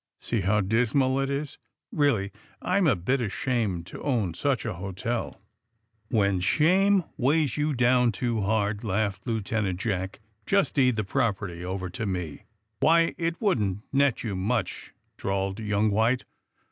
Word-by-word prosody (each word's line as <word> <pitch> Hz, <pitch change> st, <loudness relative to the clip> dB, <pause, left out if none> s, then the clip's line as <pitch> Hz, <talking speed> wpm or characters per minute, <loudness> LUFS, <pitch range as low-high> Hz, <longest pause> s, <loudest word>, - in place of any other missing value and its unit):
See 115 Hz, -3 st, -2 dB
how 105 Hz, +3 st, +2 dB
dismal 125 Hz, +6 st, +2 dB
it 135 Hz, 0 st, 0 dB
is. 140 Hz, +1 st, -4 dB, 0.3 s
Really, 115 Hz, -10 st, +1 dB, 0.3 s
I'm 195 Hz, -, +1 dB
a 130 Hz, -, +4 dB
bit 125 Hz, +10 st, 0 dB
ashamed 105 Hz, -5 st, -1 dB
to -, -, -10 dB
own 115 Hz, -, 0 dB
such 135 Hz, -, -1 dB
a 110 Hz, -, -2 dB
hotel. 95 Hz, +6 st, -4 dB, 0.3 s
' 115 Hz, -2 st, -49 dB
' 110 Hz, -1 st, -33 dB
'^When 100 Hz, -4 st, +2 dB
shame 185 Hz, -, +3 dB
weighs 145 Hz, 0 st, +2 dB
you 150 Hz, -1 st, 0 dB
down 125 Hz, 0 st, +4 dB
too 115 Hz, +4 st, -2 dB
hard/' 105 Hz, 0 st, 0 dB
laughed 100 Hz, +1 st, -1 dB
Lieutenant 105 Hz, -4 st, -1 dB
Jack, 95 Hz, -4 st, -2 dB, 0.3 s
*^just 200 Hz, -1 st, +2 dB
deed 130 Hz, -4 st, +3 dB
the 110 Hz, -, -1 dB
prop 100 Hz, +1 st, 0 dB
erty 90 Hz, -5 st, -7 dB
over 95 Hz, +1 st, -3 dB
to 105 Hz, +4 st, -4 dB
me.'' 90 Hz, -6 st, -4 dB, 0.3 s
'*Why, 165 Hz, +1 st, +4 dB
it 165 Hz, 0 st, -1 dB
wouldn't 105 Hz, -, 0 dB
net 140 Hz, -2 st, +2 dB
you 105 Hz, -5 st, -3 dB
much," 110 Hz, +6 st, -2 dB, 0.3 s
drawled 95 Hz, 0 st, -2 dB
young 105 Hz, 0 st, +1 dB
White. 115 Hz, +5 st, +2 dB
110 Hz, 160 wpm, -26 LUFS, 100-135 Hz, 0.3 s, a